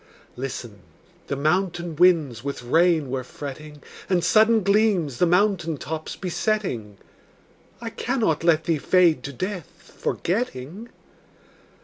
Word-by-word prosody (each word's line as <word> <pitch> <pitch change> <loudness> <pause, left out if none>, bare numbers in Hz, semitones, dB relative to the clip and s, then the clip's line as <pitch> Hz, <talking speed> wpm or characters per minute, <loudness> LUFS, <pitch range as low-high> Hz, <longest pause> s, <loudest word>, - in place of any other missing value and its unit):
Listen: 120 -5 -6 0.5
the 140 - -2
mountain 170 +3 0
winds 155 -9 +3
with 140 -3 -5
rain 160 +1 +2
were 130 -1 -2
fretting, 150 +3 -9 0.3
And 180 -3 +2
sudden 220 0 +4
gleams 200 - +2
the 180 - +4
mountain 175 -3 +2
tops 155 +3 -5
besetting. 180 - -2 0.8
I 230 -1 -6
cannot 225 - -1
let 165 -2 +3
thee 160 -2 0
fade 170 -4 +3
to 140 - -5
death, 185 +4 -7
forgetting. 185 - -3
165 Hz, 115 wpm, -24 LUFS, 140-190 Hz, 0.8 s, sudden